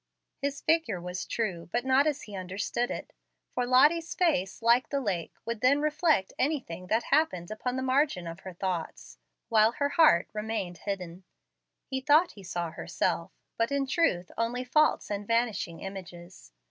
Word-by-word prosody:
His 280 0 -3
figure 315 - +1
was 180 +1 -5
true, 175 -8 -3
but 240 +1 -1
not 265 +3 +4
as 295 -2 -1
he 205 - -9
understood 195 +6 -2
it; - - -6 0.4
for 245 -1 -1
Lottie's 300 +7 +4
face, 235 - 0
like 235 +2 +4
the 280 - 0
lake, 190 - -3
would 230 -1 -4
then 275 +3 +4
reflect 305 - +1
anything 255 - -2
that 225 +5 +1
happened 275 - +2
upon 250 +4 -3
the 260 - -2
margin 260 - +1
of 165 +1 -7
her 190 - -8
thoughts, 175 -2 -4 0.3
while 220 0 +4
her 285 +2 0
heart 295 - +5
remained 210 -5 -3
hidden. 185 -3 -5 0.6
He 265 0 -3
thought 305 +6 +4
he 200 - -13
saw 175 -2 -4
herself, - - -2 0.3
but 230 +3 +1
in 280 -1 +1
truth 260 - +1
only 240 +2 -1
false 305 -2 +2
and 205 0 -3
vanishing 225 -8 0
images. 175 - -9
230 Hz, 165 wpm, -29 LUFS, 185-275 Hz, 0.6 s, heart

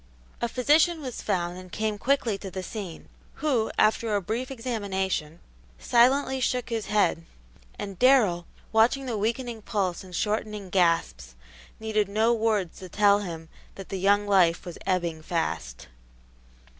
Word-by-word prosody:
A 235 - 0
physician 310 +7 +3
was 260 -5 -6
found 180 -3 -2
and 185 -1 -12
came 215 -1 -2
quickly 250 -4 +1
to 195 - -7
the 185 0 -5
scene, 190 -5 -7 0.3
who, 260 -7 0
after 215 0 +2
a - - +2
brief 225 +7 -3
examination, 195 - -3 0.4
silently 265 - +3
shook 250 -1 -1
his 225 -2 -3
head, 210 -5 +2 0.5
and 195 -3 -6
Darrell, 215 -10 +4 0.2
watching 230 +5 +3
the 240 -3 -2
weakening 230 +2 -2
pulse 195 -5 -2
and 180 -1 -10
shortening 210 -2 -2
gasps, 65 - +1 0.4
needed 215 -2 0
no 220 +3 +3
words 215 -6 0
to 185 - -9
tell 205 +1 +4
him 165 -5 -6 0.3
that 195 - -9
the 195 - -3
young 205 +2 +3
life 180 -4 +3
was 175 - -8
ebbing 170 -4 0
fast. 155 - -3
205 Hz, 145 wpm, -26 LUFS, 185-235 Hz, 0.5 s, Darrell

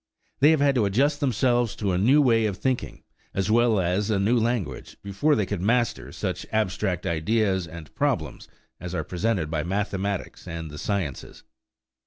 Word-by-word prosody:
They 145 - +6
have 160 -2 +3
had 140 -1 +4
to 120 -5 +2
adjust 140 +9 +2
themselves 120 -4 +1
to 100 -3 -1
a 90 - +1
new 135 +9 +5
way 115 -4 +3
of 100 -3 -4
thinking, 130 +2 -2 0.3
as 95 +1 0
well 115 -2 +4
as 95 +4 0
a 105 - +2
new 100 +5 +2
language, 115 -6 -2
before 100 +10 +1
they 105 - +1
could 95 -1 -3
master 120 +3 0
such - - -3
abstract 95 -4 -1
ideas 95 +2 0
and 80 -2 -10
problems - - -2 0.3
as 90 +1 -6
are 80 - -1
presented 90 -1 -1
by 80 -2 0
mathematics 100 +2 -3
and 80 -2 -6
the 75 - -8
sciences. 95 -10 -4
100 Hz, 175 wpm, -25 LUFS, 90-120 Hz, 0.3 s, They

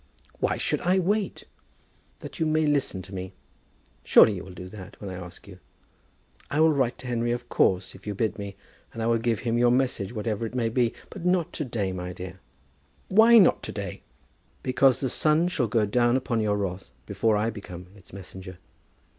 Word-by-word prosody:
"Why - - 0
should - - -1
I 185 +1 +2
wait?" 200 +3 0 0.8
"That - - -9
you 160 - +1
may 155 0 +2
listen 140 -10 0
to 95 +2 -12
me. 95 0 -6 0.7
Surely 110 - +7
you 90 - -6
will 95 - -11
do 90 0 -8
that, 95 0 -11
when 100 -2 -6
I 90 -1 -6
ask 90 +3 -12
you. 90 -2 -12 0.9
I 145 - -1
will 160 0 +5
write 130 -4 0
to 130 - -9
Henry, 120 -1 0
of 120 0 -4
course, 95 0 +2
if - - -15
you 105 - -3
bid 110 +1 -1
me; 100 -1 -6 0.4
and 115 - -4
I - - 0
will 115 0 +2
give 115 -2 0
him 120 -1 0
your 120 0 +5
message, 125 -6 +1
whatever 110 -1 -3
it 120 - -10
may 115 -2 +1
be; 120 0 +1 0.2
but - - -8
not 180 -1 +1
to 150 - -3
day, 105 -6 -2
my 90 -1 -5
dear." 90 +1 -8 0.7
"Why 225 +4 +7
not 195 -6 +5
to - - -6
day?" 100 -4 -6 0.6
"Because 130 0 +3
the 135 - +1
sun 155 +6 +2
shall 135 -9 0
go 110 0 +2
down 120 +4 +2
upon 120 -3 -1
your 105 -1 +1
wrath 95 -4 -4 0.2
before 110 - +1
I 110 +2 0
become 90 -4 -9
its 100 - -18
messenger. 95 -1 -9
115 Hz, 205 wpm, -26 LUFS, 95-130 Hz, 0.9 s, Surely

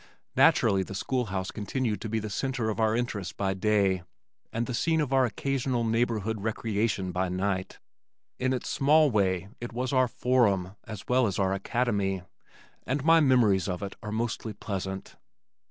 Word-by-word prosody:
Naturally 95 -1 +4
the 95 +1 -6
school 125 +5 -1
house 95 -2 -3
continued 110 +1 -2
to 110 - -4
be 110 - -1
the 110 -1 -3
center 120 +1 -1
of 110 - -5
our 110 0 +2
interest 105 -6 -3
by 95 -1 0
day 95 -1 +2 0.5
and 115 +1 -1
the 125 - -4
scene 160 +6 +1
of 145 -3 0
our 130 -1 +5
occasional 130 +1 -1
neighborhood 110 -2 0
recreation 105 -3 -1
by 90 0 -1
night. 95 +1 -2 0.6
In 130 0 +1
its 130 - -2
small 150 +1 +4
way 95 -3 +1
it 120 0 -6
was 125 +2 -2
our 130 -1 +4
Forum 105 -7 +1
as 110 -3 -8
well 125 -1 +3
as 95 - -2
our 95 -1 +1
Academy 100 -3 -1 0.6
and 135 +1 -2
my 165 0 +7
memories 115 - +3
of 90 +1 -3
it 100 - -5
are 105 -2 -6
mostly 115 0 -2
pleasant. 95 -1 -5
110 Hz, 170 wpm, -28 LUFS, 95-125 Hz, 0.6 s, my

